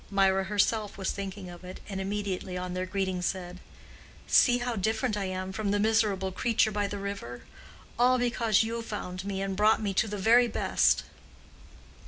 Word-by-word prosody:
Mirah 195 -1 +3
herself 210 +1 0
was 190 - -1
thinking 195 -1 -6
of 175 0 -11
it, 185 +1 -9
and 195 -2 -4
immediately 195 -2 -3
on 180 0 -4
their 185 0 -3
greeting 190 -1 -2
said, 180 0 -3 0.7
"See 245 -2 +5
how 245 -1 -2
different 220 +3 0
I 200 -1 -2
am 185 0 -4
from 205 +1 -2
the 205 - +2
miserable 205 -3 +1
creature 225 +2 +1
by 205 -1 -1
the 205 - -5
river! 195 -12 -6 0.6
all 250 +1 +5
because 235 -3 +2
you 230 +1 -3
found 185 -5 -5
me 195 -1 -2
and 195 -1 -2
brought 210 +3 +4
me 205 -3 -2
to 220 - +2
the 205 0 -4
very 235 +5 +5
best." 225 - +2
200 Hz, 180 wpm, -28 LUFS, 190-220 Hz, 0.7 s, See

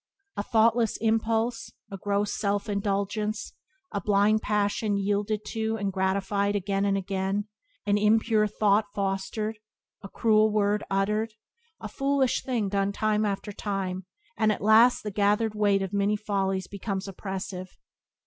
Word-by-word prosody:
A - - -1
thoughtless 225 +1 +2
impulse, 225 +1 0 0.2
a 195 - -5
gross 205 +1 0
self 200 +1 -1
indulgence, 205 +1 -2 0.4
a 200 - -2
blind 205 +2 +3
passion 205 0 0
yielded 205 +1 -1
to 220 0 -1
and 200 -2 -2
gratified 200 +2 0
again 195 0 0
and 200 0 +2
again; 195 +1 -2 0.4
an 205 0 +2
impure 215 0 +3
thought 210 0 +2
fostered, 200 +2 -2 0.4
a 195 - -9
cruel 215 0 +3
word 205 0 +1
uttered, 210 +3 0 0.4
a - - -6
foolish 275 -2 +1
thing 235 -6 -1
done 195 0 0
time 215 +1 +1
after 205 +1 -3
time, 190 -2 -4 0.3
and 215 -1 +2
at 205 - -3
last 225 +3 +5
the 210 - -4
gathered 210 +2 +1
weight 205 -2 +2
of 190 +1 -5
many 200 +1 +2
follies 195 -3 -1
becomes 200 0 -4
oppressive. 190 -1 -6
205 Hz, 140 wpm, -27 LUFS, 195-215 Hz, 0.4 s, last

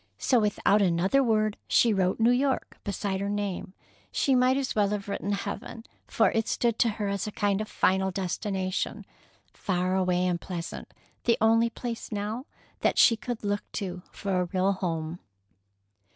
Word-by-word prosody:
So, 250 - +3
without 210 -1 +2
another 190 +8 +3
word, 215 -3 +1
she 230 -2 +4
wrote 190 0 +1
"New 230 +2 +5
York" 260 +1 0
beside 200 -1 -2
her 200 - -1
name. 200 -2 -3 0.4
She 275 - +2
might 255 +1 +4
as 270 -2 -1
well 205 -2 +3
have 205 -1 -3
written 200 0 -2
"Heaven," 225 +3 -5 0.2
for 220 - +3
it 225 -1 0
stood 235 -2 0
to 235 - +4
her 210 -2 -1
as 200 +1 -2
a - - -4
kind 205 0 0
of 215 - -4
final 190 -1 +2
destination, 190 0 -2 0.5
far 185 -1 -1
away 180 -1 +1
and 175 -1 0
pleasant, 175 -2 -6 0.3
the 235 - +4
only 230 +1 +4
place 235 0 -6
now 215 +5 -3 0.3
that - - +1
she 230 - +7
could 235 0 -5
look 205 0 -1
to 185 -4 -4
for 190 -2 -1
a - - 0
real 185 +2 +1
home. 170 -3 -3
205 Hz, 170 wpm, -27 LUFS, 185-225 Hz, 0.5 s, she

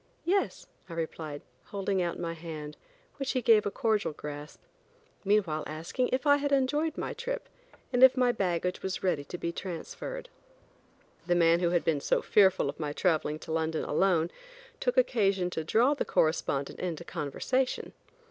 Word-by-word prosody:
"Yes," 390 +3 0 0.2
I - - -7
replied, 160 -2 -5 0.2
holding 195 -1 -1
out 170 -1 -1
my 170 -1 -3
hand, 155 -2 -7 0.4
which 275 -1 -2
he 255 - +1
gave 215 -3 +5
a - - +1
cordial 215 -4 0
grasp, 150 0 -8 0.6
meanwhile 190 -7 +2
asking 165 - -2
if 260 +3 0
I 285 -1 +6
had 285 0 -1
enjoyed 290 +4 +1
my - - -3
trip, - - -4 0.5
and 245 - +2
if 260 0 +8
my 250 -1 +4
baggage 180 -4 -1
was 190 -1 -3
ready 175 -6 +1
to 175 - -6
be 170 - -2
transferred. 195 - -6 1.0
The 175 - +3
man 170 0 +5
who 175 -1 +2
had 175 -1 +1
been 150 -3 +1
so - - +1
fearful 190 -7 +4
of 140 - -5
my 150 -2 -2
traveling 155 -3 +1
to - - -7
London 160 0 0
alone, 175 -3 +2 0.5
took - - 0
occasion 195 - +2
to 160 - -3
draw 235 - +3
the 290 - -1
correspondent 145 -3 0
into 170 -2 -3
conversation. 255 - -2
180 Hz, 165 wpm, -29 LUFS, 160-250 Hz, 1.0 s, if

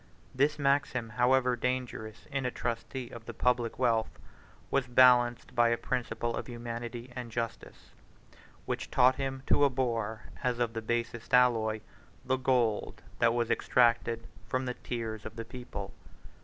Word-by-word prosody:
This 145 +3 +2
maxim, 140 -4 +1
however 125 +2 +3
dangerous 120 -3 -3
in 135 -1 -1
a 125 - 0
trustee 120 +1 -4
of 115 -1 -10
the 120 - -6
public 125 -2 +1
wealth, 115 -3 +2 0.6
was 135 -2 +1
balanced 120 -1 +5
by 120 0 +4
a 115 - +2
principle 120 -2 -2
of - - -5
humanity 120 0 -6
and 125 -2 -6
justice, 115 0 -5 0.7
which - - -3
taught 130 +1 +4
him 135 -1 -3
to 145 - +3
abhor, 115 -5 0 0.2
as 125 -2 +1
of 120 -2 0
the 115 - -3
basest 120 +1 -1
alloy, 110 -3 +3 0.4
the 130 +1 +1
gold 125 -5 0 0.2
that 115 0 +4
was 120 -1 0
extracted 115 -1 +2 0.2
from 130 0 -1
the 125 - -2
tears 110 -4 -5
of 110 0 -8
the 115 -1 -5
people. 120 -5 -7
120 Hz, 150 wpm, -30 LUFS, 115-125 Hz, 0.7 s, balanced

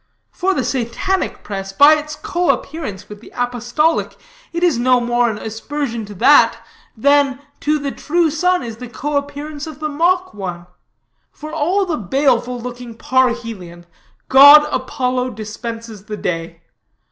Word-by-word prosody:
For 380 +1 -1
the - - 0
Satanic 265 +10 -2
press, 195 -1 -5
by 285 +9 +7
its 300 0 -3
coappearance 300 - -2
with 210 0 -11
the - - -15
apostolic, 245 +6 -1 0.3
it 340 +1 -3
is 330 -9 +2
no 250 +1 +3
more 240 0 +1
an 215 - -4
aspersion 230 +2 -4
to 205 - -10
that, 270 +9 +5 0.4
than 280 +1 +3 0.2
to 305 +1 +1
the 280 -1 -4
true 335 +2 0
sun 360 +4 +1
is 230 -2 -7
the 250 0 -9
coappearance 290 +2 -4
of 305 -2 -9
the 305 0 -3
mock 355 +5 +1
one. 180 -4 -6 0.7
For 305 +1 -10
all 350 +6 +1
the 335 -4 -2
baleful 250 +2 0
looking 245 -1 -8
parhelion, 230 -10 -1 0.4
god 285 +3 +9
Apollo 255 -1 -2
dispenses 220 0 -7
the 210 -1 -6
day. 165 -2 -4
255 Hz, 145 wpm, -18 LUFS, 225-300 Hz, 0.7 s, god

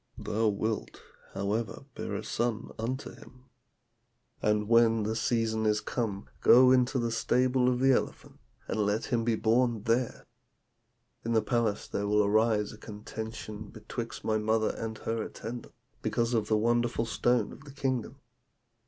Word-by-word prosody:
Thou 110 +1 0
wilt, 110 +1 -2 0.4
however, 105 +6 -2
bear 105 - -4
a 105 - -4
son 115 -2 -2
unto 130 +5 -3
him. 125 0 -16 1.0
And 105 0 +1
when 115 -1 +4
the 110 +2 -1
season 110 -1 0
is 105 0 +3
come, 105 -4 -3
go 125 +1 +7
into 130 +1 +3
the 120 -2 0
stable 125 +2 +2
of 125 -1 0
the 135 +1 +5
elephant, 130 - -2 0.3
and - - -2
let 105 +1 +1
him 120 -2 0
be 115 -1 +2
born 115 0 +2
there. 115 +2 0 1.0
In 115 - -1
the 110 - +3
palace 115 -4 0
there 100 - -2
will 105 0 +3
arise 105 0 +2
a 105 - -13
contention 110 0 -7
betwixt 115 +2 -6
my 110 0 +1
mother 110 +1 +1
and 110 -1 -5
her 115 0 -2
attendants, 115 +2 -7 0.2
because 120 +1 0
of 110 -3 +1
the 110 - +3
wonderful 120 +1 +1
stone 120 +1 +1
of 135 - -12
the 140 - -10
kingdom. 135 -3 -2
115 Hz, 155 wpm, -29 LUFS, 110-120 Hz, 1.0 s, go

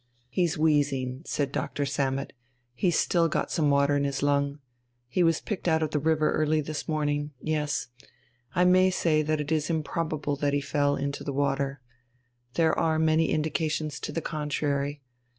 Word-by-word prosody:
"He's 170 +3 0
wheezing," 140 -4 +1
said 140 -2 -1
Doctor 145 +1 -2
Sammet, 135 0 -1 0.4
"he's 175 +7 +1
still 170 -2 +3
got - - -1
some 150 -3 +2
water 140 0 +3
in 140 - +1
his 140 0 -2
lung. 140 0 +1 0.5
He 150 +9 0
was 165 -2 +3
picked 200 -4 -4
out 160 -1 +3
of 155 - -2
the 150 - +1
river 155 +1 +2
early 155 0 +2
this 155 0 -4
morning 145 -1 -1
yes. 150 -2 -1 0.7
I 180 - +4
may 185 +1 +5
say 165 -4 +2
that 155 0 0
it 150 +1 -3
is 155 -2 +1
improbable 155 -2 -1
that 145 0 0
he 145 - +2
fell 145 0 +1
into 140 0 -3
the 140 - -3
water. 140 -1 -1 0.7
There 160 -2 +3
are 160 -1 +2
many 160 0 +3
indications 155 -1 -1
to - - -5
the 165 - -2
contrary. 145 -2 -2
150 Hz, 170 wpm, -27 LUFS, 140-160 Hz, 0.7 s, may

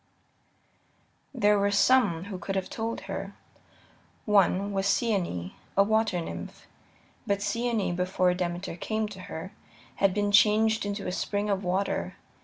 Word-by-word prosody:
There 210 -6 +3
were 200 0 +2
some 200 -5 +3
who 195 -2 -6
could 195 - -4
have 190 -1 -2
told 225 +1 -3
her. - - -6 0.9
One 200 -1 +3
was 195 0 0
Cyane, 190 - 0 0.3
a 200 - +7
water 220 -3 +1
nymph. 165 - -7 0.6
But 200 -1 0
Cyane, 220 -3 0
before 180 0 +1
Demeter 175 0 -3
came 215 +5 -2
to 200 -2 -10
her, 175 +2 -7 0.5
had 195 -1 +3
been 205 +1 0
changed 215 +1 +4
into 200 0 -4
a 180 - -2
spring 205 +2 -1
of 195 0 -1
water. 190 +2 -1
200 Hz, 140 wpm, -28 LUFS, 185-210 Hz, 0.9 s, a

